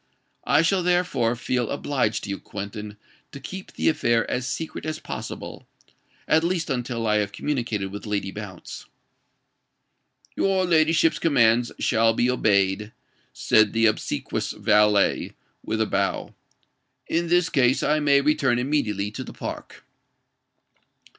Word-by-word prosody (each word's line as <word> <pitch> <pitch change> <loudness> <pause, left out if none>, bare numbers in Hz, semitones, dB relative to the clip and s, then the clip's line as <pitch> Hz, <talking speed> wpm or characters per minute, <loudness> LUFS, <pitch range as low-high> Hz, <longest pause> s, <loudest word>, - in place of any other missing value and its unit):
I 155 - +4
shall 185 +3 +2
therefore 175 -10 +1
feel 120 -1 -2
obliged 130 -7 -1
to 100 - -4
you, 100 - -4
Quentin, 105 +1 -7 0.3
to 140 - -9
keep 190 +7 -8
the - - -1
affair 115 -7 +2
as 125 0 -2
secret 160 +5 -5
as 155 0 -3
possible—at 160 0 -5
least 170 -3 -1
until 120 -2 -2
I 105 -1 +2
have 105 -1 -1
communicated 115 -7 -3
with 105 +2 -8
Lady 100 -2 -2
Bounce." 100 -4 -9 1.5
"Your 190 -1 +1
ladyship's 165 -1 +3
commands 120 -6 +3
shall 115 0 +2
be 125 +2 +2
obeyed," 105 -2 +1 0.4
said 110 -2 +3
the 115 0 +3
obsequious 110 - -1
valet, 105 -1 +2 0.3
with 110 - -2
a 110 - +2
bow. 100 -2 -2 0.7
"In 170 +1 0
this 175 0 +2
case, 130 -4 +2
I 155 +1 +2
may 140 -2 +4
return 140 -4 +2
immediately 115 -7 -1
to - - -6
the - - -10
Park." - - -8
120 Hz, 135 wpm, -24 LUFS, 105-155 Hz, 1.5 s, I